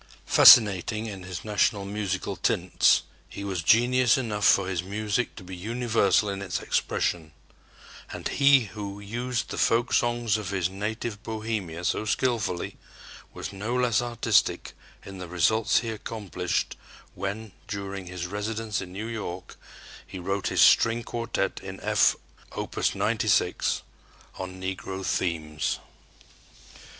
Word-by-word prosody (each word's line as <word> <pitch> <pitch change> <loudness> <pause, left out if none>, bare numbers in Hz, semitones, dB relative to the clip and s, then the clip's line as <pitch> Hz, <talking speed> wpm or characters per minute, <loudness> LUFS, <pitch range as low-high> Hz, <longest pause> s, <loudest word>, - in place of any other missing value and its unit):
Fascinating 110 -2 +7
in 100 -4 -6
his 90 0 -7
national 100 -1 +1
musical 100 -1 -3
tints, 95 -1 +2 0.3
he 100 - -7
was 95 -4 -2
genius 120 - +4
enough 105 -5 -2
for 95 -2 +4
his 90 -3 -1
music 105 +5 -2
to 100 - -10
be 90 0 -8
universal 110 0 +1
in 100 -1 -3
its 95 -2 -3
expression; 80 -3 -1 0.8
and - - -5
he 140 -1 +5
who 100 -2 -7
used 120 +4 -3
the - - -4
folksongs 120 -1 +2
of 105 -4 -5
his 95 -2 -1
native 105 +2 -4
Bohemia 110 -7 -4
so 100 - 0
skillfully 110 -5 -1 0.5
was - - -7
no 110 +5 -3
less 125 -3 +2
artistic 120 -1 +1 0.3
in 95 -1 -9
the 90 - -6
results 110 +7 +2
he 115 - -4
accomplished 100 -5 -3 0.4
when, 100 +2 -5 0.2
during 100 -2 -5
his 90 -1 -5
residence 105 +3 -3
in 90 -1 -8
New 100 +4 -5
York, 95 -6 -6 0.5
he - - -8
wrote 95 +2 -2
his - - +1
string 115 +1 +5
quartet 115 0 -2
in - - -8
F - - +3 0.4
(Opus - - -2
96) - - +1 0.6
on 95 0 -6
Negro 95 0 -5
themes. 80 -4 -1
100 Hz, 130 wpm, -26 LUFS, 95-115 Hz, 0.8 s, Fascinating